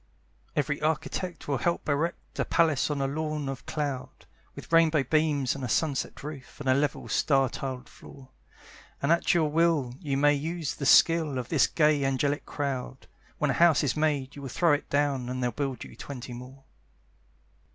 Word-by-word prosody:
Every 145 Hz, 0 st, -1 dB
architect 160 Hz, +3 st, -2 dB
will 140 Hz, -3 st, 0 dB
help 170 Hz, -2 st, -1 dB
erect 155 Hz, +4 st, -2 dB
A -, -, +3 dB
palace 160 Hz, -5 st, +2 dB
on 145 Hz, -2 st, -1 dB
a -, -, +1 dB
lawn 150 Hz, 0 st, -3 dB
of 135 Hz, -1 st, -6 dB
cloud, 145 Hz, -4 st, -4 dB, 0.3 s
With -, -, -11 dB
rainbow 160 Hz, -3 st, +5 dB
beams 145 Hz, -2 st, +1 dB
and 135 Hz, -, -7 dB
a 125 Hz, -, -3 dB
sunset 140 Hz, +1 st, -1 dB
roof, 145 Hz, -3 st, -9 dB
And -, -, -6 dB
a 130 Hz, -, +5 dB
level 145 Hz, +2 st, -1 dB
star 135 Hz, -3 st, +2 dB
tiled 130 Hz, -1 st, -5 dB
floor; 135 Hz, -2 st, -14 dB, 0.7 s
And 140 Hz, -, +1 dB
at 170 Hz, +2 st, +3 dB
your 160 Hz, -3 st, +3 dB
will 160 Hz, -6 st, +2 dB
you 140 Hz, -6 st, -2 dB
may 145 Hz, +1 st, +4 dB
use 160 Hz, +1 st, -3 dB
the 140 Hz, -, -3 dB
skill 160 Hz, -4 st, +5 dB
Of 125 Hz, -2 st, -4 dB
this 155 Hz, -, +4 dB
gay 150 Hz, -3 st, +2 dB
angelic 140 Hz, +2 st, 0 dB
crowd, 130 Hz, -2 st, -4 dB, 0.3 s
When 150 Hz, -2 st, +1 dB
a -, -, 0 dB
house 165 Hz, 0 st, +4 dB
is 135 Hz, -, 0 dB
made 145 Hz, -3 st, 0 dB
you 145 Hz, -, -9 dB
will 135 Hz, -, -6 dB
throw 165 Hz, +5 st, +3 dB
it 145 Hz, -, -2 dB
down, 140 Hz, -3 st, 0 dB
And 130 Hz, 0 st, -3 dB
they'll 125 Hz, -, +1 dB
build 135 Hz, 0 st, -3 dB
you -, -, -12 dB
twenty 125 Hz, 0 st, -8 dB
more. 130 Hz, +3 st, -11 dB
145 Hz, 185 wpm, -28 LUFS, 135-155 Hz, 0.7 s, rainbow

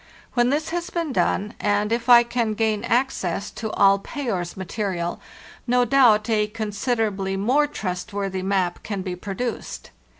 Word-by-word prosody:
When 240 Hz, -1 st, +3 dB
this 300 Hz, +4 st, 0 dB
has 345 Hz, +1 st, -3 dB
been 330 Hz, -5 st, -2 dB
done, 210 Hz, -1 st, 0 dB
and 205 Hz, +1 st, +1 dB
if 235 Hz, +1 st, -1 dB
I 240 Hz, -1 st, +9 dB
can 235 Hz, -2 st, -1 dB
gain 215 Hz, -1 st, 0 dB
access 235 Hz, -6 st, -1 dB
to 220 Hz, -, -5 dB
all 195 Hz, 0 st, +5 dB
Payer's 195 Hz, -9 st, -4 dB
material, 185 Hz, -2 st, -3 dB, 0.5 s
no 245 Hz, 0 st, +3 dB
doubt 235 Hz, -4 st, +4 dB
a 215 Hz, -2 st, +2 dB
consider 220 Hz, +2 st, -1 dB
ably 195 Hz, -2 st, -3 dB
more 260 Hz, +9 st, +2 dB
trustworthy 195 Hz, -4 st, -4 dB
map 185 Hz, -2 st, 0 dB
can 200 Hz, -3 st, -4 dB
be 185 Hz, -2 st, -4 dB
produced. 205 Hz, +6 st, -5 dB
215 Hz, 155 wpm, -23 LUFS, 195-245 Hz, 0.5 s, I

